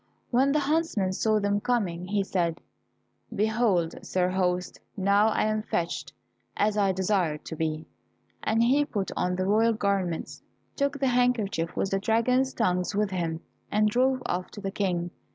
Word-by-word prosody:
When 265 +3 +3
the 300 +1 +2
huntsman 285 - 0
saw 215 +2 +2
them 205 0 +1
coming, 190 -8 -1
he 200 +1 0
said, 170 -3 -1 0.8
"Behold, 210 -6 +1
sir 180 -1 0
host, 180 -1 -1 0.2
now 200 +2 +4
I 220 - +1
am 215 0 0
fetched 175 -5 -3 0.5
as 210 0 +2
I 200 -2 +3
desired 185 -5 0
to 160 - -6
be," 155 0 -2 0.6
and 225 +1 +2
he 270 +5 +4
put 205 -9 -3
on 180 0 0
the 185 +1 -1
royal 220 +3 +3
garments, 195 -5 -2 0.3
took 280 0 -1
the 270 -1 +2
handkerchief 235 -9 +1
with 195 - 0
the 195 - +1
dragon's 250 +5 +2
tongues 180 -4 0
with 205 -1 +1
him, 165 -3 -2 0.3
and 210 0 +3
drove 255 +2 +2
off 180 +1 -2
to - - -8
the 195 -1 -4
King. 180 -4 -1
200 Hz, 165 wpm, -27 LUFS, 180-230 Hz, 0.8 s, now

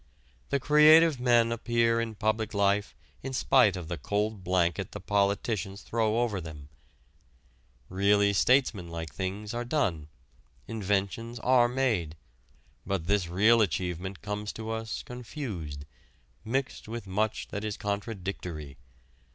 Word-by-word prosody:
The 140 - +1
creative 150 +1 +6
men 120 -2 +3
appear 115 0 +1
in 115 -1 -4
public 110 0 -1
life 100 -1 +1 0.3
in 135 0 -5
spite 125 -6 +4
of 90 -3 -6
the 85 -2 -4
cold 105 +4 -2
blanket 90 -2 0
the - - -6
politicians 100 0 -1
throw 115 0 0
over 105 -6 -1
them. 75 -3 -10 1.2
Really 100 +2 +3
statesmanlike 90 - +1
things 100 +3 -4
are 120 +1 -2
done, 115 - -1 0.6
inventions 105 +2 -2
are 125 -2 +4
made. 120 -12 0 0.7
But 95 -3 -2
this 100 -1 +1
real 105 +7 +4
achievement 90 0 -2
comes 105 +1 -4
to 110 0 -6
us 110 0 -4
confused, 110 - -6 0.6
mixed 130 +2 -3
with 115 -2 -6
much 105 +3 -2
that 105 0 -5
is 105 -1 -3
contradictory. 95 - -5
105 Hz, 125 wpm, -28 LUFS, 95-115 Hz, 1.2 s, creative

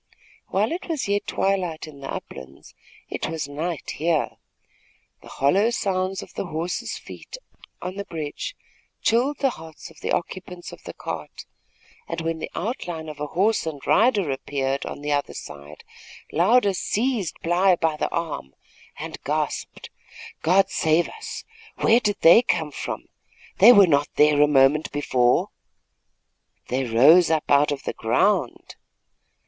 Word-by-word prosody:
While 205 +4 0
it 345 +2 -5
was 310 -9 -2
yet 205 0 0
twilight 185 -5 -1
in 145 -2 -12
the 135 - -6
uplands, 65 +1 -9 0.3
it - - -4
was 160 -3 -3
night 155 +3 -4
here. 160 -1 0 0.8
The - - -15
hollow 190 +11 +2
sounds 190 -4 -1
of - - -14
the 195 - -4
horse's 165 +2 -3
feet - - -10 0.5
on 185 +2 -5
the 200 - -4
bridge 155 -3 -5 0.5
chilled 255 +6 +2
the 270 -2 +3
hearts 160 -4 -11
of 155 - -18
the - - -3
occupants 180 0 -4
of - - -12
the - - -8
cart, - - -7 0.6
and 165 - -4
when 165 0 -2
the - - -5
outline 175 -7 -4
of 150 -1 -9
a 150 - -3
horse 195 +4 +1
and 150 -3 -4
rider 210 - +3
appeared 135 0 -2
on - - -7
the 145 0 -3
other 145 0 -1
side, 75 +1 -10 0.5
Louder 200 +5 +3
seized 215 - -1
Bly 180 +2 +4
by 160 -2 0
the 150 - -2
arm 155 - -4 0.4
and - - -7
gasped: - - -3 0.5
"God 190 +4 +3
save 160 +2 +2
us! 445 - -8 0.3
Where 230 +2 +4
did 210 -4 -1
they 170 +8 +8
come 160 -10 -1
from? - - -5 0.5
They 220 +6 +10
were 205 -4 +8
not 145 -4 +2
there 150 -1 +5
a 150 - +6
moment 145 +2 +3
before." 125 -4 +2 1.2
"They 130 +2 0
rose 145 +10 +6
up 160 -2 0
out 145 +1 +5
of 145 - -4
the - - -3
ground." - - 0
165 Hz, 155 wpm, -24 LUFS, 145-195 Hz, 1.2 s, They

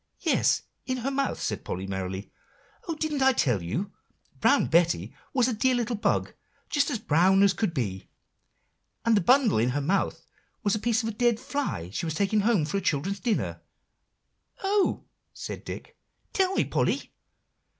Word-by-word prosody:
"Yes, - - +2 0.2
in 255 0 -1
her 275 - +1
mouth," 275 0 -1
said 105 - -3
Polly 95 +1 -4
merrily. 95 0 -4 0.6
"Oh! 330 - -2
didn't 305 -2 -2
I 265 0 +5
tell 125 - +1
you? 175 - -3 0.5
Brown - - +4
Betty 170 +1 +2 0.2
was 255 -2 +3
a 255 - 0
dear 255 +4 +2
little 240 -1 -1
bug, 210 - 0 0.4
just 285 -3 +2
as - - -1
brown 190 +1 +4
as 200 -2 +5
could 210 -3 0
be; 105 - -3 1.0
and 230 -1 +4
the 205 - +3
bundle 250 - +4
in 120 +3 +2
her - - +2
mouth 185 +8 0 0.4
was 205 -3 +2
a 215 - 0
piece 230 +1 +1
of 225 - -1
a - - -4
dead 235 0 +2
fly 250 - -3
she 165 - -3
was 160 - -3
taking 200 +4 +2
home 205 -6 +2
for 155 +6 -2
her - - -1
children's 190 +5 0
dinner." 235 -4 -1 1.0
"Oh!" 395 0 +1 0.3
said - - -7
Dick; - - -8 0.4
"tell 380 0 +2
me, - - +2
Polly." - - -1
205 Hz, 175 wpm, -27 LUFS, 155-250 Hz, 1.0 s, I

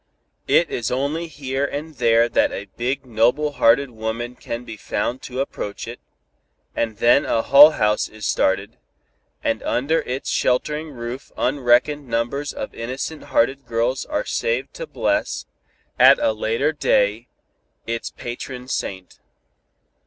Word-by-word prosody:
"It 170 - +4
is 120 -4 -2
only 145 +6 -1
here 135 -3 -3
and 150 +3 -4
there 115 -1 +4
that 120 - +2
a 100 - -5
big 130 +3 -2
noble 125 +6 +2
hearted 135 0 +3
woman 115 +2 -4
can 120 0 -6
be 120 - -8
found 120 +4 -3
to 130 +1 -6
approach 105 -7 -5
it, 120 +1 -7 0.8
and 110 -2 -2
then 120 +5 +5
a 115 - 0
Hull 145 +3 +8
House 105 -1 +1
is 110 -1 -8
started, 95 +2 0 0.7
and - - 0
under 155 +6 +1
its 130 +2 -4
sheltering 150 +5 0
roof 125 0 -7
unreckoned 135 +2 +2
numbers 120 +5 -1
of - - -6
innocent 130 +6 -5
hearted 135 +2 +1
girls 115 +3 0
are 300 +11 -2
saved 485 0 -1
to - - -7
bless, - - -1 0.5
at - - +8
a 290 -1 +2
later 485 -2 0
day, - - +1 0.6
its 115 0 -3
patron 125 +1 -7
saint. 95 -7 -5
125 Hz, 140 wpm, -22 LUFS, 115-145 Hz, 0.8 s, Hull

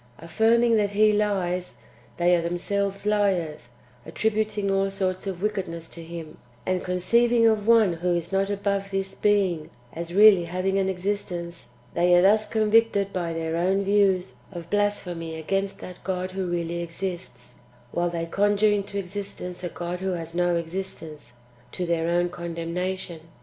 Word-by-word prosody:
"^ - - -30
Affirming 225 +7 +3
that 205 -1 +2
He 215 +1 +4
lies, 185 -4 0 0.4
they 175 0 +4
are 170 - +1
themselves 195 +4 -2
liars, 180 -11 0 0.3
attributing 210 - -1
all 195 0 +2
sorts 190 -1 -2
of 185 -1 -4
wickedness 180 -6 -2
to 170 - -8
Him; 165 -1 -9 0.3
and 185 -1 0
con 180 - -2
ceiving 235 +5 +4
of 215 -1 +1
one 225 -6 +5
who 175 +1 0
is 170 +1 -3
not 195 +1 +1
above 200 -1 -1
this 195 0 -2
Being 195 -7 +1 0.2
as 170 +1 -5
really 200 -2 +7
having 185 +3 -1
an 190 0 +1
existence, 180 -4 -3 0.3
they 175 +1 +4
are 175 - +5
thus 210 +2 +4
convicted 215 -2 +2
by 175 -2 -2
their 165 0 -2
own 190 +3 +1
views 195 -6 +2 0.2
of 170 -1 -9
blasphemy 180 -6 -1
against 195 +5 -1
that 180 -1 -10
God 185 -1 -2
who 190 -1 -3
really 170 0 -2
exists, 170 -7 -6 0.4
while 175 0 0
they 170 -1 -3
conjure 205 +4 +2
into 200 -1 -2
existence 195 -2 -5
a 175 - -2
God 175 +1 -5
who 190 0 -1
has 165 -1 -5
no 175 0 +2
existence, 165 -5 -6 0.4
to 180 - -2
their 165 -1 0
own 175 +1 +2
condemnation. 170 +1 -4
185 Hz, 160 wpm, -25 LUFS, 170-200 Hz, 0.4 s, really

